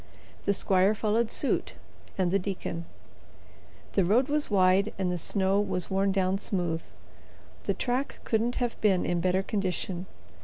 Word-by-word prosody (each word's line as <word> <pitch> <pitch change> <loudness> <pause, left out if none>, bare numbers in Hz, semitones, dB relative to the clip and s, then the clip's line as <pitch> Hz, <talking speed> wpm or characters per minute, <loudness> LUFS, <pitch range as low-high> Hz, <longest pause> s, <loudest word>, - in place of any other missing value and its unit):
The 200 - +3
squire 190 +2 +3
followed 220 +2 +1
suit 280 - -1 0.4
and 185 -2 +1
the 195 - +3
deacon. 180 -3 -4 1.1
The 195 - +3
road 230 +10 +3
was 295 0 0
wide 195 +1 +3
and 185 -2 0
the 180 - -1
snow 195 +2 +2
was 185 -3 -2
worn 195 +1 +2
down 190 0 +1
smooth. 175 -5 -1 0.8
The - - 0
track 255 +3 -2
couldn't 230 +2 0
have 245 -2 -2
been 195 -4 +3
in 175 -1 0
better 185 +2 +1
condition. 185 -2 -2
195 Hz, 150 wpm, -28 LUFS, 185-215 Hz, 1.1 s, The